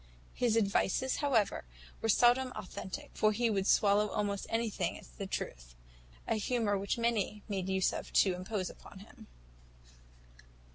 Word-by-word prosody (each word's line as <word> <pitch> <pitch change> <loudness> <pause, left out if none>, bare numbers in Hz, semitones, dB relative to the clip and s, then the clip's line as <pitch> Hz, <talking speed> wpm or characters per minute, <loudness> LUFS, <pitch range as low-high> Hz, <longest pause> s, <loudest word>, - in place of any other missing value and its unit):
His 235 -2 +1
advices, 210 +4 +1
however, 250 -9 +1 0.4
were 225 - -1
seldom 245 +4 +4
authentic; 190 -2 -7
for 215 - +3
he 230 +2 +1
would 195 -1 0
swallow 205 +1 +4
almost 200 -1 -2
anything 220 -6 -1
as - - -14
a 195 - -3
truth - - -5 0.5
a 225 - +1
humour 220 -1 0
which 200 +3 -1
many 220 -3 0
made 190 -3 -3
use 190 -1 +2
of - - -6
to 190 - +4
impose 185 +1 -3
upon - - -14
him. - - -16
210 Hz, 145 wpm, -32 LUFS, 195-230 Hz, 0.5 s, seldom